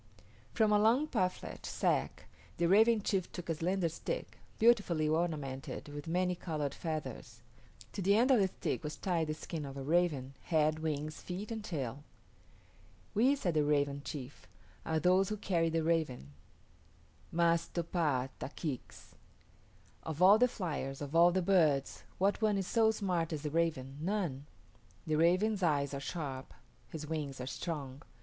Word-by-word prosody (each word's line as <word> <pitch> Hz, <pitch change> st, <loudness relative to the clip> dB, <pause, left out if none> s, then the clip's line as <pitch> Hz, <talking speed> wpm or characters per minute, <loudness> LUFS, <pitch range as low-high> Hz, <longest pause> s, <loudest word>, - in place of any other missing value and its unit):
From 220 Hz, -2 st, +2 dB
a 210 Hz, -, +5 dB
long 230 Hz, +7 st, +4 dB
parfleche 185 Hz, -10 st, -2 dB
sack -, -, -1 dB, 0.3 s
the 170 Hz, -, +1 dB
Raven 215 Hz, +3 st, +5 dB
chief 190 Hz, -4 st, -1 dB
took 175 Hz, -2 st, -7 dB
a -, -, +2 dB
slender 175 Hz, +3 st, 0 dB
stick, 165 Hz, -, -5 dB, 0.2 s
beautifully 205 Hz, -9 st, +3 dB
ornamented 150 Hz, -4 st, -2 dB
with 145 Hz, +1 st, -7 dB
many 180 Hz, +2 st, +1 dB
colored 155 Hz, -5 st, -3 dB
feathers. 155 Hz, -2 st, -5 dB, 0.5 s
To 200 Hz, -, -4 dB
the 200 Hz, +2 st, +4 dB
end 245 Hz, +5 st, +4 dB
of 250 Hz, -, +6 dB
the 195 Hz, -, +4 dB
stick 180 Hz, -, -3 dB
was 150 Hz, 0 st, -4 dB
tied 170 Hz, -4 st, 0 dB
the 155 Hz, -, -2 dB
skin 160 Hz, 0 st, -5 dB
of 135 Hz, -1 st, -7 dB
a 135 Hz, -, -5 dB
raven 150 Hz, -4 st, +1 dB
head, 155 Hz, -2 st, +2 dB
wings, 155 Hz, -1 st, -3 dB
feet, 195 Hz, +5 st, -6 dB
and 220 Hz, -2 st, -4 dB
tail. 140 Hz, -, -4 dB, 1.1 s
"We," 250 Hz, +7 st, +4 dB
said 180 Hz, -11 st, -1 dB
the 155 Hz, -1 st, +3 dB
Raven 145 Hz, -1 st, +1 dB
chief, 140 Hz, -2 st, -8 dB, 0.4 s
"are 160 Hz, 0 st, +1 dB
those 185 Hz, +3 st, +3 dB
who 215 Hz, -, -2 dB
carry 170 Hz, -5 st, +1 dB
the 165 Hz, 0 st, 0 dB
raven 155 Hz, -, -1 dB, 1.0 s
(M[)a]s 170 Hz, 0 st, +2 dB
to 170 Hz, -, -1 dB
p[=a]h´ 150 Hz, -7 st, 0 dB
t[)a] -, -, -4 dB
k[=i]ks). 145 Hz, -7 st, -6 dB, 0.9 s
Of 160 Hz, -1 st, -5 dB
all 195 Hz, +4 st, +7 dB
the 250 Hz, -, +6 dB
fliers, 150 Hz, -, -4 dB
of 145 Hz, +2 st, -6 dB
all 170 Hz, +1 st, +7 dB
the 185 Hz, +1 st, 0 dB
birds, 155 Hz, -7 st, +2 dB, 0.2 s
what 200 Hz, +3 st, +1 dB
one 215 Hz, -2 st, +2 dB
is 195 Hz, -, -1 dB
so 225 Hz, +3 st, +3 dB
smart 180 Hz, -6 st, -1 dB
as 155 Hz, -2 st, -4 dB
the 150 Hz, -, -3 dB
raven? 145 Hz, -4 st, -1 dB
None. 165 Hz, -7 st, -2 dB, 0.6 s
The 155 Hz, -, -1 dB
raven's 185 Hz, +6 st, +3 dB
eyes 145 Hz, -5 st, +1 dB
are 140 Hz, -, -3 dB
sharp, 135 Hz, -2 st, -5 dB, 0.3 s
his 155 Hz, -1 st, -6 dB
wings 150 Hz, -4 st, -4 dB
are 125 Hz, -, -4 dB
strong. 140 Hz, -1 st, -5 dB
165 Hz, 165 wpm, -33 LUFS, 145-190 Hz, 1.1 s, all